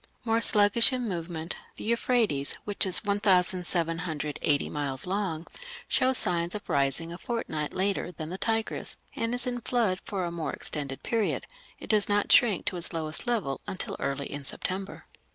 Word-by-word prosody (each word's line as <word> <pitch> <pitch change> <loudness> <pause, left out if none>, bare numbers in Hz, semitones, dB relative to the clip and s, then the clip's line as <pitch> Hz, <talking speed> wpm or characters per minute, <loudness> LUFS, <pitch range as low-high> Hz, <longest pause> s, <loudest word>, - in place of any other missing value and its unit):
More 225 0 +2
sluggish 210 +2 +6
in 250 -2 -2
movement, 170 -2 -4 0.2
the - - -8
Euphrates, 225 - +2
which 205 -1 -1
is 185 - +3
1780 175 -6 +1
miles 140 -3 -3
long, 185 -4 -2 0.4
shows 260 0 +3
signs 170 +1 +1
of 210 - -6
rising 140 +4 0
a 175 - -9
fortnight 160 - -3
later 190 -1 0
than 160 -2 -7
the 185 - -4
Tigris, 225 -1 -1 0.2
and 230 +1 -1
is 245 - +4
in 245 -1 -3
flood 220 -7 0
for 195 -3 -3
a 170 - -3
more 170 -2 -3
extended 140 -3 -4
period; 225 -3 0 0.3
it - - -9
does 210 -1 +3
not 205 0 +1
shrink 215 -7 +5
to 180 - -1
its 175 +1 +1
lowest 155 +6 -2
level 205 -14 -1
until 190 - -3
early 140 0 -2
in 145 0 -6
September. 190 +7 -2
185 Hz, 165 wpm, -28 LUFS, 160-215 Hz, 0.4 s, sluggish